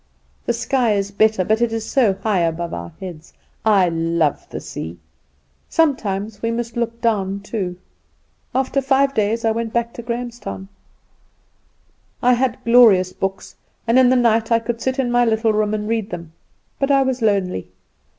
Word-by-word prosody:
The - - +2
sky 240 -1 +1
is 200 0 -1
better, 215 -2 +2
but 220 +3 +1
it 235 -1 +2
is 225 -1 -3
so 235 -8 +3
high 195 0 0
above 170 0 -1
our 85 0 -6
heads. 175 -4 -9 0.3
I 200 -4 +4
love 165 -2 0
the - - -5
sea. 80 +2 -7 0.7
Sometimes 215 -9 0
we 230 - 0
must 230 0 -3
look 235 -1 -2
down 200 -4 0
too. 195 -4 -4 0.8
After 265 +1 +1
five 275 +1 +2
days 220 +1 0
I 225 - +3
went 225 0 -3
back 235 0 -1
to - - -7
Grahamstown. 235 -4 -5 1.5
"I 250 +1 +4
had 245 -1 +1
glorious 220 -7 +6
books, 195 0 -4 0.3
and 235 +3 +4
in 255 -1 +6
the 255 - +4
night 230 -2 +2
I 230 - +6
could 230 0 -4
sit 260 0 -1
in 255 -3 0
my 245 0 +4
little 225 -1 +2
room 210 0 +1
and 210 0 -4
read 220 -2 -1
them; 170 -4 -7 0.5
but 275 - 0
I 275 -1 +4
was 260 -1 -2
lonely. 195 - 0
225 Hz, 170 wpm, -20 LUFS, 195-240 Hz, 1.5 s, glorious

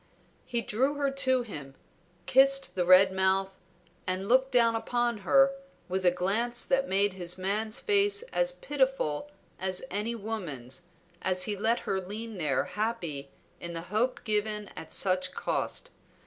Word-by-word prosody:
He 235 -1 -1
drew 265 +8 0
her 280 -1 0
to 260 -2 +2
him, 145 - -9 0.5
kissed 275 +1 +4
the 180 -2 0
red 185 +1 +7
mouth 190 0 +1 0.6
and 185 +1 -2
looked 260 +3 +3
down 235 -2 +4
upon 240 0 -1
her 270 +8 +4 0.4
with 185 +1 -2
a 180 - +6
glance 215 +7 -1
that 270 0 +1
made 200 +1 +2
his 180 -1 -3
man's 210 +4 -1
face 410 +1 +2
as - - +3
pitiful 265 - -1 0.3
as 185 0 -1
any 215 +4 -1
woman's 175 - -5 0.3
as 185 -1 +1
he 205 +2 -1
let 220 +4 +1
her 190 -1 -2
lean 210 +2 -6
there 145 -5 +1
happy 180 -9 -3 0.3
in 170 0 -6
the 165 - -4
hope 245 +4 0
given 210 -2 -1
at - - -10
such 185 -1 +1
cost. - - -2
210 Hz, 150 wpm, -29 LUFS, 185-245 Hz, 0.6 s, red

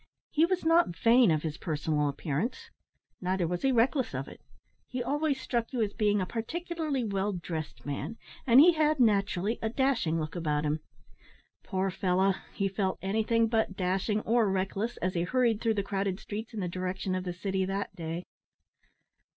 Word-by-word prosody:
He 320 +3 +4
was 370 -2 -1
not 330 - +4
vain 230 +4 +5
of 155 -2 +1
his 160 0 -4
personal 150 -2 0
appearance; 150 - -3 0.5
neither 185 -1 0
was 175 +1 -2
he 270 - +3
reckless 250 - +2
of 135 +1 -3
it. - - -12 0.5
He 250 -1 -3
always 290 +1 0
struck 235 -3 -2
you 240 -3 +1
as 205 -1 -2
being 210 -2 +2
a 185 - 0
particularly 310 - -3
well 200 -1 -1
dressed 165 -4 -5
man, 145 +10 -4 0.3
and 245 +1 +8
he 345 +4 +8
had 305 -2 +2
naturally 205 -2 +2
a 220 - 0
dashing 235 - +1
look 155 +1 -4
about 150 -3 0
him. 150 +1 0 0.8
Poor 190 -1 -1
fellow! 190 +1 +2 0.2
he 195 - -1
felt 195 -1 -1
anything 220 +3 +2
but 220 -4 0
dashing 190 +3 0
or 225 -1 +2
reckless 195 +4 -1
as 185 +1 -1
he 170 - 0
hurried 230 +3 +1
through 225 -2 +1
the 200 - 0
crowded 195 -1 -2
streets 215 +1 -6
in 220 -3 -4
the 180 - -1
direction 185 +2 -3
of 185 0 -1
the 180 - -3
city 190 +1 -1
that 195 +2 -3
day. 165 +1 -5
200 Hz, 180 wpm, -29 LUFS, 180-235 Hz, 0.8 s, and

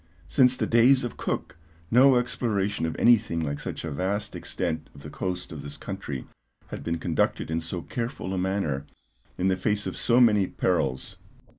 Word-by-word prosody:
Since 130 -2 +4
the - - 0
days 125 +3 +5
of 120 - -4
Cook - - -3 0.3
no 130 +2 +7
exploration 105 -7 0
of 80 - -4
anything 110 -8 +4
like 70 -3 -2
such - - -5
a 80 - -4
vast 100 +7 -2
extent 80 -2 -3
of 70 - -13
the 75 - -8
coast 90 +4 -3
of 80 -3 -6
this 70 0 -7
country 95 -9 -5 0.4
had - - -6
been 85 0 -1
conducted 80 -1 0
in 80 +1 0
so 85 +1 -5
careful 115 -5 -4
a - - -1
manner, 90 -7 -1 0.5
in 95 - +1
the 95 - +3
face 105 +2 0
of 95 - -3
so 120 +1 +3
many 105 -6 +5
perils. 70 -8 -1
95 Hz, 180 wpm, -26 LUFS, 80-115 Hz, 0.5 s, no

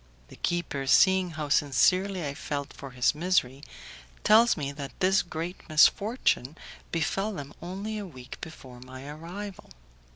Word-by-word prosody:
The - - -12
keeper, 165 -6 -2
seeing 190 +5 +5
how 150 -2 -3
sincerely 180 +6 +2
I 140 - -3
felt 140 -1 -4
for 140 - -9
his 125 -1 +2
misery, 150 -5 0 0.6
tells 225 +3 +6
me 140 -2 -3
that 140 -1 -8
this 190 +1 +4
great 170 +2 -5
misfortune 160 - +3 0.3
befell 195 +5 0
them 145 -5 -7
only 200 +5 -5
a 205 - -6
week 130 -6 -11
before 130 -6 -10
my 130 +2 -10
arrival. 175 +6 -8
160 Hz, 140 wpm, -28 LUFS, 140-190 Hz, 0.6 s, tells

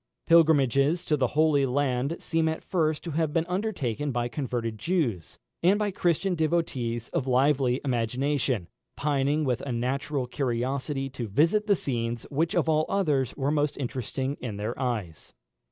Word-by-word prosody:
Pilgrimages 155 -1 +4
to 150 - +2
the 135 -3 +1
Holy 155 -3 +4
Land 135 +2 0
seem 160 0 0
at 160 - -4
first 155 -5 0
to 170 - -5
have 155 0 0
been 165 +1 +1
undertaken 170 - -2
by 120 -1 -1
converted 115 -4 -3
Jews, 125 - -1 0.2
and 185 +4 +4
by 210 -1 0
Christian 180 +1 +1
devotees 145 -9 -1
of 135 - -2
lively 130 -1 +3
imagination, 125 -3 0 0.3
pining 145 +1 +1
with 125 -4 0
a 140 - -4
natural 130 +3 -1
curiosity 135 +2 -2
to 120 -3 -5
visit 165 - +2
the 200 - +5
scenes 120 -6 -3
which 160 +4 0
of 170 -2 +2
all 155 -1 +2
others 150 - 0
were 140 0 0
most 150 -1 0
interesting 130 +1 -3
in 110 -5 -4
their 105 +3 -2
eyes. 105 - -3
140 Hz, 155 wpm, -27 LUFS, 125-160 Hz, 0.3 s, the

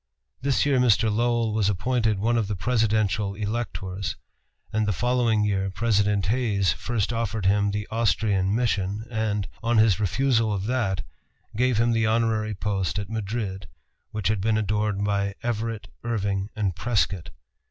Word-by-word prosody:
This 135 -1 +2
year 140 -3 +3
Mr. 110 -3 +3
Lowell 120 -1 +1
was 105 -2 +2
appointed 110 +2 +1
one 115 +4 +1
of 115 -3 +1
the 105 - -2
presidential 110 -2 +1
electors; 100 -3 -3 0.6
and 110 0 +1
the 105 - +1
following 120 -1 +2
year 95 -2 0
President 105 -2 +1
Hayes 105 -4 +1
first 120 -1 -2
offered 115 -3 -2
him 100 +1 +3
the 105 +1 -3
Austrian 105 -3 +1
mission, 105 -3 0
and, 105 -3 -1
on 115 0 +1
his 110 -3 +4
refusal 115 +2 +2
of 100 -1 -2
that, 105 -6 0 0.5
gave 125 0 +2
him 115 +1 +3
the 115 -1 +2
honorary 110 -1 +1
post 100 0 -1
at 100 0 -4
Madrid, 105 -3 -3 0.4
which 105 -3 -2
had 110 -3 0
been 110 +1 +2
adorned 105 -1 0
by 100 -1 0
Everett, 115 -2 -2 0.2
Irving, 100 -4 -1
and 100 -5 -1
Prescott. 100 -2 0
105 Hz, 150 wpm, -25 LUFS, 100-115 Hz, 0.6 s, his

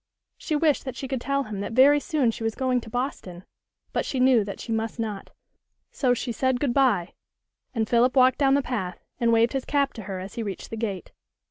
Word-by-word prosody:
She 310 - -3
wished 300 -1 +2
that 260 - -5
she 270 - -5
could 260 -2 -3
tell 275 +2 0
him 215 -5 -6
that 200 +3 -4
very 280 +4 +6
soon 280 -4 +1
she 225 - -7
was 225 -1 -1
going 255 -2 0
to 225 - -11
Boston, 215 -8 -4 0.5
but - - 0
she 265 - -3
knew 255 -3 +5
that 200 0 -7
she 230 - -6
must 225 0 -2
not; 215 -4 -4 0.6
so 250 -3 +1
she 245 0 -3
said 260 +1 0
good 270 -4 0
bye, 235 -10 +2 0.6
and 220 -2 0
Philip 245 +3 +3
walked 255 -1 +5
down 275 -1 +4
the 280 - +1
path, 210 -9 -4 0.2
and 235 -2 +2
waved 230 +1 +3
his 270 -1 -1
cap 280 -1 0
to 220 - -8
her 190 -2 -5
as 190 +2 -8
he 235 - -4
reached 200 -4 -6
the - - -3
gate. 205 -5 -4
245 Hz, 230 wpm, -25 LUFS, 220-265 Hz, 0.6 s, very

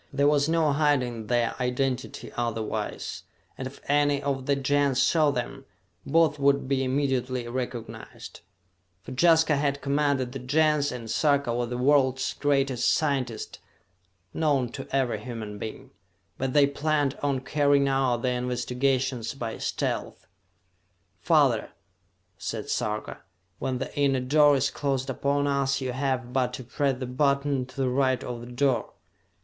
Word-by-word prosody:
There 140 +1 +2
was 145 0 +3
no 160 -3 +2
hiding 130 -7 +1
their 120 0 +1
identity 125 -2 -2
otherwise, 115 -2 -3 0.3
and 130 - -5
if 135 - -12
any 145 0 +3
of 135 -2 -3
the 140 - +3
Gens 140 -1 +1
saw 155 0 +4
them, 135 -1 -4 0.4
both 160 0 +3
would 140 -1 +2
be 135 -1 +1
immediately 130 -2 -1
recognized 120 -1 -6 0.6
for - - -9
Jaska 160 +2 +4
had 140 0 -1
commanded 140 -3 +1
the 135 - -6
Gens, 150 +2 +2
and 120 -2 -7
Sarka 140 0 +1
was 120 0 -1
the 125 - -3
world's 130 0 +2
greatest 135 -3 +1
scientist 135 -7 -1 0.7
known 145 -6 +1
to 135 +3 -8
every 130 -5 0
human 110 -3 -6
being. 110 - -7 0.5
But 130 -1 -1
they 145 -1 +6
planned 145 0 0
on 140 -3 0
carrying 140 0 +2
out 130 -3 +1
their 125 -1 0
investigations 125 +1 -1
by 115 -4 -5
stealth. - - -3 0.9
"Father," - - +2 0.7
said - - -4
Sarka, 105 0 -2 0.4
"when 130 -1 -2
the 135 - -6
inner 140 -2 +2
door 145 +3 +4
is 135 0 +1
closed 135 -2 -2
upon 140 +2 0
us, 140 -1 +1
you 130 -2 -3
have 130 -1 -2
but 125 -1 +1
to 130 - -6
press 135 +2 -1
the 130 - -4
button 140 0 0
to 130 - -16
the 135 -2 +1
right 130 0 +1
of 120 -1 -5
the 120 +1 -10
door. 130 0 0
135 Hz, 145 wpm, -26 LUFS, 125-140 Hz, 0.9 s, they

